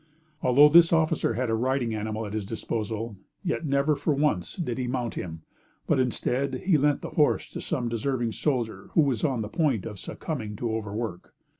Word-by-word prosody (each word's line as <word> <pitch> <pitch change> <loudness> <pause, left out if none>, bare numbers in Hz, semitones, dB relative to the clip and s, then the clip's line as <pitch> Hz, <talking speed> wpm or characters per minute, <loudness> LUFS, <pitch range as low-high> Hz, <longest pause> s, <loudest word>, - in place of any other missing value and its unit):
Although 140 +4 +7
this 165 +2 +7
officer 160 -8 +2
had 125 0 -1
a - - +1
riding 120 0 0
animal 110 +1 -3
at 105 - -6
his 110 -1 -2
disposal, 110 +1 -4 0.3
yet 170 -3 -1
never 140 +2 +2
for 145 +1 0
once 135 - 0
did 130 -9 -3
he 125 - -1
mount 120 -2 -2
him; 80 -2 -6 0.4
but - - +2
instead, 130 +1 -1
he 185 -3 +4
lent 145 0 +2
the - - -5
horse 150 -2 +2
to - - -6
some 130 -7 -2
deserving 120 +1 -1
soldier 115 -8 -2
who 160 - +5
was 135 -7 0
on 130 -6 +1
the - - -4
point 130 - 0
of 105 -3 -7
succumbing 110 - -5
to 115 +1 -2
overwork. 105 -3 -5
125 Hz, 190 wpm, -27 LUFS, 110-145 Hz, 0.4 s, Although